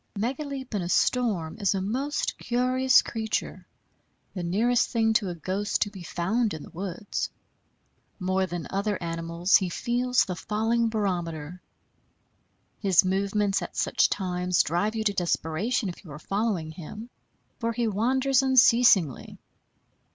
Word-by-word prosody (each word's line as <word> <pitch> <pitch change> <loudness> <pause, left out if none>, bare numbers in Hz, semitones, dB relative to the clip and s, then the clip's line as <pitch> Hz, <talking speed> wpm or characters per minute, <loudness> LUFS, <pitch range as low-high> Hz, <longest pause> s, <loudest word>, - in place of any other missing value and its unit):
Megaleep 265 +3 -4
in 205 - 0
a 175 - -4
storm 205 -9 +1
is 200 -1 +1
a - - 0
most 255 +10 -2
curious 255 +1 +3
creature, 220 -1 -3 0.7
the 185 - -4
nearest 225 +8 +1
thing 225 -2 +2
to 210 -3 +1
a 175 - -4
ghost 195 +5 -1
to 205 - -8
be 195 -3 -10
found 200 +5 -1
in 155 - -8
the - - -12
woods. 195 +3 -4 0.9
More 185 0 0
than 175 -2 -5
other 200 +1 -1
animals 170 +1 +1
he 190 -3 -2
feels 245 +6 +1
the 180 - -4
falling 225 +5 0
barometer. 175 -6 -3 1.2
His 190 -2 +4
movements 195 +1 0
at - - -7
such - - +2
times 180 -2 0
drive 190 +7 -1
you 220 - -1
to 205 -2 +1
desperation, 185 +6 -1
if 180 - -7
you 165 - -12
are 145 - -7
following 195 -3 -2
him; 205 +9 -9 0.5
for 230 -2 -1
he 235 0 -1
wanders 260 +6 +2
unceasingly. 240 - +4
205 Hz, 145 wpm, -26 LUFS, 180-235 Hz, 1.2 s, His